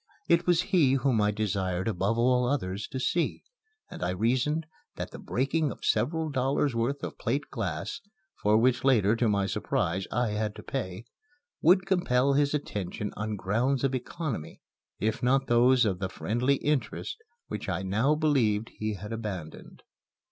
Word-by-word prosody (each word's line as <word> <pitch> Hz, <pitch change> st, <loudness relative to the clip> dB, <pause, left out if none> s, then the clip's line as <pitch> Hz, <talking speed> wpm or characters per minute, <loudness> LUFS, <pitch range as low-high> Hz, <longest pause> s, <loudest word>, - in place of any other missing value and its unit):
It 170 Hz, +1 st, +3 dB
was 175 Hz, 0 st, +4 dB
he 145 Hz, -8 st, +5 dB
whom 130 Hz, -4 st, +2 dB
I 105 Hz, -, +3 dB
desired 95 Hz, -3 st, -1 dB
above 105 Hz, +2 st, 0 dB
all 125 Hz, +1 st, +3 dB
others 100 Hz, -7 st, -2 dB
to 130 Hz, -, -5 dB
see, 165 Hz, +5 st, 0 dB, 0.5 s
and -, -, -8 dB
I 90 Hz, -, 0 dB
reasoned 125 Hz, -, +1 dB, 0.3 s
that -, -, -5 dB
the -, -, -9 dB
breaking 140 Hz, +3 st, 0 dB
of -, -, -8 dB
several 160 Hz, +3 st, +1 dB
dollars' 135 Hz, +1 st, +1 dB
worth 120 Hz, +5 st, -1 dB
of -, -, -6 dB
plate 140 Hz, +6 st, -2 dB
glass 95 Hz, -, -3 dB, 0.4 s
(for 105 Hz, +1 st, +4 dB
which 125 Hz, +2 st, +2 dB
later, 115 Hz, -6 st, +4 dB
to 115 Hz, -1 st, +1 dB
my 100 Hz, -1 st, +2 dB
surprise, 95 Hz, -1 st, -1 dB
I 120 Hz, 0 st, +1 dB
had 105 Hz, 0 st, -2 dB
to -, -, -10 dB
pay) 110 Hz, -5 st, -4 dB, 0.6 s
would 180 Hz, +3 st, +5 dB
compel 140 Hz, -8 st, +2 dB
his 145 Hz, +1 st, +2 dB
attention 105 Hz, -7 st, -4 dB
on 105 Hz, +1 st, -3 dB
grounds 120 Hz, +8 st, 0 dB
of 135 Hz, -1 st, +1 dB
economy, 130 Hz, -, -4 dB, 0.4 s
if 110 Hz, +3 st, -1 dB
not 135 Hz, +2 st, +3 dB
those 125 Hz, +1 st, +4 dB
of 95 Hz, -4 st, 0 dB
the 95 Hz, -1 st, -2 dB
friendly 120 Hz, +8 st, 0 dB
interest 145 Hz, 0 st, -2 dB, 0.3 s
which -, -, -5 dB
I 90 Hz, +1 st, -2 dB
now 110 Hz, +10 st, +2 dB
believed 120 Hz, -9 st, +1 dB
he 110 Hz, -1 st, -4 dB
had 105 Hz, +4 st, -7 dB
abandoned. 100 Hz, -8 st, -7 dB
120 Hz, 165 wpm, -28 LUFS, 105-140 Hz, 0.6 s, he